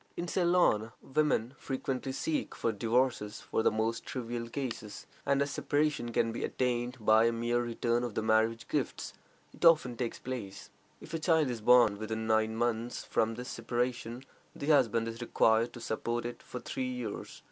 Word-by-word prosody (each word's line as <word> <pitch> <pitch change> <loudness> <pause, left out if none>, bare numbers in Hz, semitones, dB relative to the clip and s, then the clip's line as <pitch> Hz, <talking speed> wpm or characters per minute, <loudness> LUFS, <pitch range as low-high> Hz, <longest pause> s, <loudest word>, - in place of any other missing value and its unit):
In 175 - -3
Ceylon, 170 - +2
women 135 -4 +1
frequently 135 0 -3
seek 295 - -2
for 115 - 0
divorces 115 -1 0
for - - -1
the - - +4
most 110 +2 -1
trivial 120 -2 -4
causes, 115 -5 -5 0.2
and 140 0 +3
as 140 - -4
separation 145 -5 0
can 115 0 +1
be 115 - -4
attained 125 0 -1
by 110 +1 +5
a 115 - +3
mere 120 +1 0
return 120 0 0
of 120 -4 -4
the 110 - 0
marriage 110 +1 +2
gifts, 145 -5 -2 0.4
it - - -11
often 155 -8 +5
takes 120 -1 -3
place. 110 -7 -6 0.3
If - - -11
a 165 - -1
child 160 -4 +3
is 115 -2 -5
born 115 -3 +5
within 110 +1 -3
nine 110 0 +2
months 120 0 -1
from 115 0 +1
this 125 +2 -6
separation, 120 +1 -2 0.3
the - - -5
husband 115 -6 +4
is 115 +1 -6
required 115 0 +3
to - - -8
support 115 +1 -2
it 120 - -6
for 125 - -7
three 130 +1 -3
years. 125 -4 -5
120 Hz, 175 wpm, -31 LUFS, 115-130 Hz, 0.4 s, by